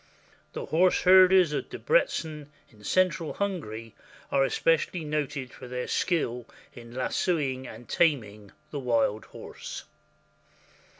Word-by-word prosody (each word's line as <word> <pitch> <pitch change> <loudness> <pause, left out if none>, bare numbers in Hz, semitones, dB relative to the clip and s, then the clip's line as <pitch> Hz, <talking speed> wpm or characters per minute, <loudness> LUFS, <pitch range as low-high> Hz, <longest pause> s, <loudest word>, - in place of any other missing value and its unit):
The - - -5
horse 180 +3 +2
herders 185 -3 +7
of - - -3
Debreczen, 155 - 0 0.2
in 105 -2 -19
central 180 - +1
Hungary, 115 - -4 0.4
are 135 -1 +3
especially 165 +4 +1
noted 145 -4 -3
for - - -10
their 125 0 -4
skill 125 -9 -1 0.3
in 120 -1 -12
lassoing 130 -1 -1
and 115 +2 -11
taming 110 - 0 0.2
the 145 - -3
wild 115 -4 +1
horse. - - -9
145 Hz, 115 wpm, -27 LUFS, 120-170 Hz, 0.4 s, herders